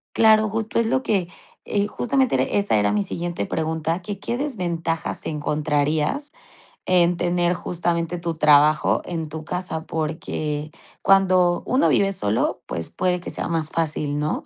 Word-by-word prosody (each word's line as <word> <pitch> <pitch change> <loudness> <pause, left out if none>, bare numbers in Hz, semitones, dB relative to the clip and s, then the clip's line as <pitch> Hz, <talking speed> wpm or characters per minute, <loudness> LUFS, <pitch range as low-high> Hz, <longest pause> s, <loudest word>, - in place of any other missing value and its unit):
Claro, 220 -1 +5
justo 225 +1 -1
es 230 - +2
lo 260 +3 +1
que, 190 -5 0 0.4
eh, 205 0 0
justamente 260 - +1
era, 130 - +2
esa 200 - +1
era 105 0 +2
mi 105 -1 +1
siguiente 170 +6 -3
pregunta, 160 +2 -2
¿que 200 +2 -5
qué 235 +4 -3
desventajas 175 - -2
encontrarías 150 - -1 0.5
en 175 -1 +4
tener, 175 0 +1
justamente 175 -1 -2
tu 170 -1 -3
trabajo 150 0 +4
en 165 -3 -4
tu 155 0 -7
casa?, 180 -3 -4
porque 155 -1 -3 0.3
cuando 185 -2 +4
uno 260 +4 +3
vive 195 0 +3
solo, 105 - -1
pues 80 - -5
puede 180 -1 -1
que - - -6
sea - - -3
más 160 -2 -1
fácil, 150 -3 -1
¿no? 150 +1 -1
170 Hz, 155 wpm, -23 LUFS, 155-195 Hz, 0.5 s, Claro